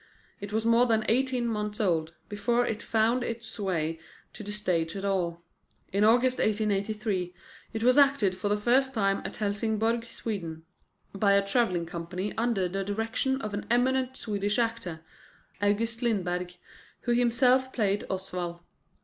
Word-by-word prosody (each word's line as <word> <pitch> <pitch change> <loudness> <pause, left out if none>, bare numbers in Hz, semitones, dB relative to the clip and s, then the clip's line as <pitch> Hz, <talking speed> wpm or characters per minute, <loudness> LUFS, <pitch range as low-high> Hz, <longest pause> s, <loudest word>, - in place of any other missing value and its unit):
It 205 0 -7
was 220 +1 0
more 230 +2 +5
than 220 -2 +2
eighteen 255 0 +1
months 210 -1 -2
old 165 -6 +1
before 235 +4 +1
it 225 -1 -3
found 230 +3 +1
its 230 -1 -5
way 165 -5 -1 0.3
to - - -9
the 205 0 -6
stage 175 -5 -1
at 195 0 -4
all. 175 -3 -1 0.5
In 200 +1 +3
August 245 +4 +4
1883 210 -3 0 0.4
it 225 0 -3
was 250 +3 +5
acted 275 -10 +4
for 195 +2 -2
the 205 - +2
first 260 +5 +2
time 195 -2 +1
at - - -5
Helsingborg, 220 +2 0
Sweden, 170 -9 -5 0.5
by 200 0 +3
a 200 0 +3
travelling 195 -6 +1
company 175 +4 -4
under 225 -5 +1
the 195 +2 -3
direction 225 +6 -1
of 215 -1 -4
an 205 - -4
eminent 260 +2 +1
Swedish 205 -1 -1
actor, 225 -9 -2 0.6
August 225 +3 0
Lindberg, 180 -6 -1 0.5
who 240 - -1
himself 250 +2 +3
played 205 -5 0
Oswald. 180 -2 -4
210 Hz, 150 wpm, -28 LUFS, 195-235 Hz, 0.6 s, more